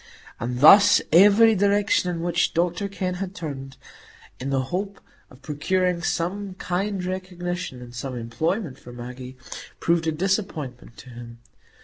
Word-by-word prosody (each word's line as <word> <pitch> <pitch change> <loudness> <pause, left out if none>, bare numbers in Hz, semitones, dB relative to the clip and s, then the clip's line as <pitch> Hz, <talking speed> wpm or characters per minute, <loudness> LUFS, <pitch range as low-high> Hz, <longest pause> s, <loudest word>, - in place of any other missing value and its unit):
And 125 +2 -3
thus 200 +7 +8
every 205 +6 +7
direction 200 -2 +2
in 170 -1 -3
which 170 -1 0
Dr 175 +3 0
Kenn 190 -2 -3
had 195 0 -5
turned, 135 -6 -7 0.6
in 130 - -4
the 135 -1 0
hope 195 +2 -3 0.3
of 130 -2 -18
procuring 175 +5 0
some 185 +3 -2
kind 190 +1 -2
recognition 180 -6 -5
and 120 0 -12
some 125 +1 -5
employment 155 - -3
for 120 - -12
Maggie, 125 +1 -9 0.4
proved 170 -1 +1
a - - +2
disappointment 155 - -3
to 130 - -12
him. 120 -1 -10
170 Hz, 140 wpm, -24 LUFS, 130-190 Hz, 0.6 s, thus